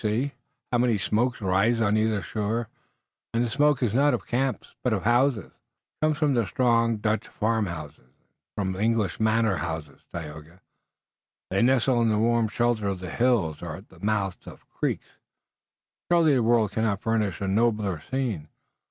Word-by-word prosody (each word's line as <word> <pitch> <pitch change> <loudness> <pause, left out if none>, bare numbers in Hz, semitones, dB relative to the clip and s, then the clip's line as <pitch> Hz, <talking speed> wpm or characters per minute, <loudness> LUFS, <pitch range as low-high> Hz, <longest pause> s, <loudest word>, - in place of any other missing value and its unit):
See, 115 +6 0 0.4
how 120 - +2
many 120 -3 +3
smokes 120 +5 0
rise 100 +5 +2
on 105 -2 +2
either 110 -2 +1
shore, 110 +4 -2 0.7
and 115 - +2
the - - -3
smoke 145 -1 +2
is 110 -4 +1
not 140 +4 +4
of - - -7
camps, 130 +1 -2
but 125 - +1
of 100 - -1
houses." 120 -2 +2
"It - - -48
comes 155 -1 +2
from 140 -7 +2
strong 115 -2 +2
Dutch 105 +1 -1
farmhouses, 90 -10 -2
and 65 +1 -30 0.4
from 95 -2 -2
English 110 -2 0
manor 110 -2 +2
houses, 80 -3 -5
Tayoga. 80 +2 -8 0.9
They 95 - +2
nestle 125 0 +3
in 115 - +3
the 105 - +2
warm 115 +1 +2
shelter 115 -1 0
of 95 -2 -2
the 90 -2 -6
hills 110 -11 +1
or - - -5
at - - -13
the - - -17
mouths 100 -3 -1
of - - -11
the - - -35
creeks. - - -2 1.1
Surely, 165 -3 +5
the 130 - +3
world 115 -2 +3
cannot 110 -3 0
furnish 110 -4 0
a 100 - -2
nobler 105 -4 +1
scene." 120 - -2
110 Hz, 170 wpm, -26 LUFS, 100-120 Hz, 1.1 s, Surely